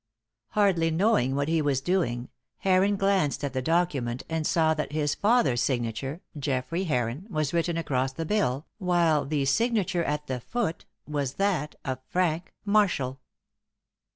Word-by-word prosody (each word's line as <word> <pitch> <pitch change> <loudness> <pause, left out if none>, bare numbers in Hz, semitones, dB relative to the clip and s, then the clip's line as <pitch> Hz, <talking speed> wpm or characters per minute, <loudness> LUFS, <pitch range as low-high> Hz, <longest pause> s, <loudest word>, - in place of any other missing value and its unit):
Hardly 190 -6 +3
knowing 160 - +2
what 140 0 0
he 160 0 +2
was 140 -3 +1
doing 135 -8 -1 0.3
Heron 195 +2 +3
glanced 195 -8 +1
at 140 -2 -2
the 130 - -1
document 140 -6 0
and 160 -1 -1
saw 160 -2 +3
that 150 -2 -4
his 150 -1 +1
father's 205 - +2
signature 125 +5 -2 0.2
Geoffrey 140 +7 -1
Heron 125 - -1
was 155 -5 -1
written 170 0 0
across 135 -5 0
the 165 +5 -4
bill, 155 -8 0
while 170 -5 +2
the 145 -2 0
signature 195 - +1
at 150 -1 -2
the 130 -3 -3
foot 215 - -3 0.2
was 145 -3 -2
that 185 -7 0
of 130 -1 -2
Frank 175 -1 0
Marshall. 185 -11 +2
155 Hz, 150 wpm, -27 LUFS, 135-185 Hz, 0.3 s, Hardly